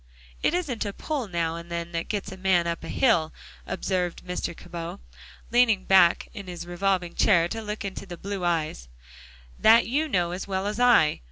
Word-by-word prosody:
"It 340 - +2
isn't 295 -10 -2
a 200 -2 -4
pull 285 -3 -3
now 170 -3 -1
and 170 0 -9
then 170 0 -4
that 165 -1 -3
gets 205 -3 -3
a - - -7
man 185 -2 +2
up 170 -1 -3
hill," 165 -3 +2 0.4
observed 180 -2 -2
Mr. 180 -2 -4
Cabot, 170 -1 -7 0.5
leaning 230 -5 +3
back 185 -3 +5
in 200 -4 -8
his 175 -1 -6
revolving 175 0 -1
chair 170 -5 +4
to 225 - -4
look 210 -1 -5
into 195 0 -6
the 175 -1 -8
blue 195 +1 -5
eyes, 155 - -1 0.7
"that 225 +2 +6
you 295 +7 0
know 175 - 0
as 180 +3 -5
well 190 0 -2
as 210 +2 -3
I. 240 -11 +5
185 Hz, 185 wpm, -26 LUFS, 170-210 Hz, 0.7 s, that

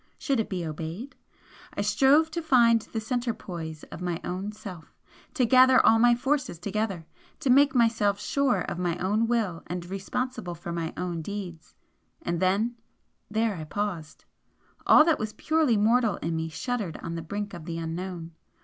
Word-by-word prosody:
Should 275 -4 0
it 220 - -1
be 180 -3 -3
obeyed? 165 - -6 0.6
I - - -1
strove 270 +10 +4
to 335 - -3
find 235 -7 +4
the 225 - -5
centre 240 +1 -2
poise 160 -6 -7
of - - -8
my 175 -2 -2
own 190 +3 -4
self 200 -6 -10 0.4
to 255 -5 +3
gather 255 +2 +6
all 225 - +6
my 240 +1 +5
forces 270 - -1
together, 195 -1 -3 0.3
to 275 -5 +1
make 275 +1 +5
myself 225 -4 +2
sure 270 -9 +1
of 175 - -4
my 175 -1 -1
own 210 +5 +1
will 215 -8 0
and 175 0 -4
responsible 195 +1 -4
for 170 +1 -7
my 165 -1 -3
own 175 -2 -3
deeds, 180 -3 -7 0.5
and 170 0 -1
then 205 +6 +1 0.5
then 220 -3 0
I - - -5
paused. 170 -2 -4 0.6
All 305 - +8
that 330 -2 +2
was 215 0 -3
purely 315 -8 +2
mortal 225 0 +3
in 165 +1 -3
me 160 0 -2
shuddered 210 - -3
on 165 - -4
the 165 - -4
brink 205 +5 -5
of 170 -3 -8
the 165 0 -4
Unknown. 165 +1 -5
205 Hz, 175 wpm, -27 LUFS, 170-240 Hz, 0.6 s, All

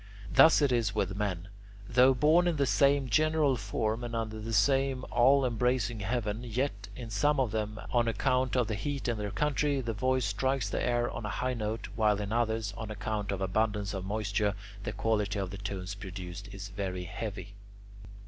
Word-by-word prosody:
Thus 160 -2 +7
it 140 - +3
is 115 -4 +1
with 95 -2 -1
men: 100 -3 -2 0.4
though 125 +2 +5
born 160 +7 +4
in 175 - +1
the 140 -2 +2
same 140 +4 +3
general 155 +1 +3
form 110 +2 -2
and 120 -1 -4
under 110 -1 -3
the 110 +1 -5
same 135 +4 +2
all 130 +3 +5
embracing 120 -1 0
heaven, 105 +1 -2
yet 115 -3 -2
in 120 -2 -7
some 145 +8 +2
of 125 -5 +1
them, 110 0 -3
on 120 -1 +2
account 125 +3 +1
of 125 -2 +3
the 110 - -3
heat 140 +5 -3
in 115 -3 -1
their 105 -1 -2
country, 145 +3 0
the 115 -3 -2
voice 130 +3 +1
strikes 135 0 0
the - - -2
air 120 0 +1
on 120 - -6
a 105 - -3
high 125 +4 -1
note, 110 -2 -3
while 105 -2 +2
in 105 +1 -3
others, 110 -3 0
on 110 -1 -6
account 105 -1 -3
of 100 -1 -3
abundance 105 +1 0
of 95 -2 -4
moisture, 105 0 -1 0.3
the - - -2
quality 105 -2 0
of 95 -1 -3
tones 100 -1 -4
produced 95 0 -8
is 100 0 -7
very 95 -2 -4
heavy. 105 +2 -6
110 Hz, 190 wpm, -30 LUFS, 105-125 Hz, 0.4 s, Thus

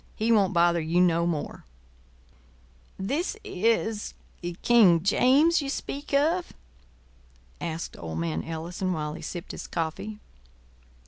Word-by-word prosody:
He 225 +2 0
won't 200 -5 +4
bother 170 -1 +3
you 165 +3 +1
no 170 -1 +3
more." 160 -4 -3 1.3
"This—is—King—James—you 230 - +2
speak—of?" 290 +5 -1 1.1
asked 165 0 -4
old 80 -1 -5
man 80 -1 -2
Ellison, 175 +3 -3
while 150 -2 -3
he - - -8
sipped 175 0 -6
his - - -7
coffee. 170 +6 -4
180 Hz, 90 wpm, -27 LUFS, 165-235 Hz, 1.3 s, won't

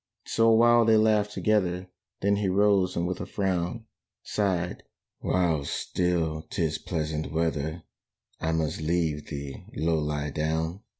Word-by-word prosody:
So 115 0 +2
a 115 - +6
while 120 +1 +6
they 110 -1 +5
laughed 105 -1 +3
together; 95 -4 0 0.3
Then 100 +1 +2
he 100 -1 0
rose 95 -1 +3
and 85 - 0
with 90 0 -3
a - - -5
frown 95 +2 -1 0.4
Sighed, 90 -4 -1 0.4
"While 85 -5 +1
still 80 +1 -1
'tis 80 -2 -1
pleasant 80 -3 -3
weather, 80 0 -1 0.6
I 80 - -1
must 80 -1 -1
leave 80 -2 0
thee, 70 -3 -6
Low 80 0 +1
lie 75 -1 -2
down." 80 +5 -1
85 Hz, 140 wpm, -27 LUFS, 80-100 Hz, 0.6 s, a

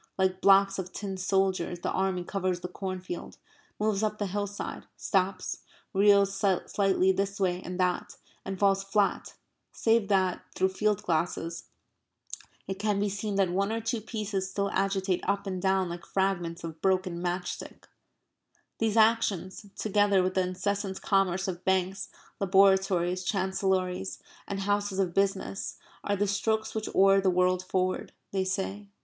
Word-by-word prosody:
Like 190 -1 +1
blocks 195 0 +5
of 185 -1 -5
tin 195 -2 -5
soldiers 185 -2 0
the - - -1
army 190 -2 0
covers 185 -1 -2
the 180 - -4
cornfield, 185 -1 -6 0.4
moves 210 -1 +1
up 215 -1 0
the 205 - -1
hillside, 205 +1 -4
stops, 190 -1 0 0.3
reels 200 0 +5
slightly 195 0 +2
this 195 +1 -2
way 180 -2 +1
and 180 0 -6
that, 180 -1 0 0.3
and 195 0 -4
falls 195 0 +3
flat, 200 +1 0 0.4
save 225 -2 +2
that, 190 -3 +2
through 190 - +2
field 210 +1 0
glasses, 165 0 -1 1.0
it 190 0 -4
can 210 -1 +1
be 205 0 +1
seen 200 +1 -3
that 195 -3 +2
one 200 +3 0
or 225 - -1
two 225 0 -2
pieces 205 -3 -3
still 200 +1 -1
agitate 195 -1 0
up 200 +1 0
and 185 -2 -3
down 190 -1 +2
like 175 0 -7
fragments 180 -3 -1
of 160 -1 -7
broken 185 -2 +1
match 180 0 -1
stick. - - -10 0.9
These 225 -1 +1
actions, 215 -3 +2
together 205 -2 +3
with 185 0 0
the 190 - +2
incessant 190 +2 -2
commerce 195 -1 +2
of 180 -1 -4
banks, 190 +1 0 0.3
laboratories, 190 -2 +3
chancellories, 190 -1 -1 0.3
and 195 -1 -3
houses 205 0 0
of 185 -3 0
business, 195 0 -1 0.3
are 205 - 0
the 205 +1 +1
strokes 220 +2 0
which 220 -1 -3
oar 195 0 +6
the 190 - +3
world 180 0 +2
forward, 185 0 -1 0.2
they 190 -1 0
say. 195 +2 -3
195 Hz, 155 wpm, -28 LUFS, 185-200 Hz, 1.0 s, oar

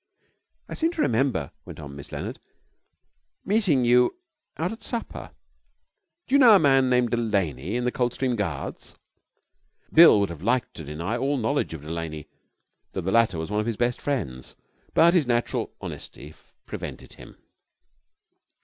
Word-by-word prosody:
'I - - -7
seem 325 +1 0
to 320 - -2
remember,' 115 - 0
went - - -11
on 70 -2 -9
Miss 70 0 -9
Leonard, - - -5 1.1
'meeting 190 - +2
you 125 - +4 0.4
out 170 +4 -1
at 225 - -9
supper. 235 -2 -5 1.0
Do 260 - -7
you 280 - +6
know 235 -5 +8
a - - +6
man 135 -3 +4
named 125 -2 +2
Delaney 100 - -1
in 125 0 -1
the 125 - +1
Coldstream 125 +1 -1
Guards?' 85 -11 -5 1.0
Bill 165 -10 +8
would 100 -3 0
have 80 -2 -9
liked 120 +5 0
to 80 - -7
deny 85 +10 -4
all 140 +3 0
knowledge 125 - -1
of 75 - -10
Delaney, 80 -1 -5 0.7
though - - -3
the 95 - -2
latter 115 -5 +3
was 80 +4 -5
one 105 - 0
of 105 - -2
his 115 -3 -2
best 120 0 0
friends, 75 - -4 0.4
but 170 +1 +6
his 165 -8 +3
natural 120 -1 -1
honesty 75 +2 -8 0.3
prevented - - -8
him. - - -14
120 Hz, 160 wpm, -25 LUFS, 85-135 Hz, 1.1 s, know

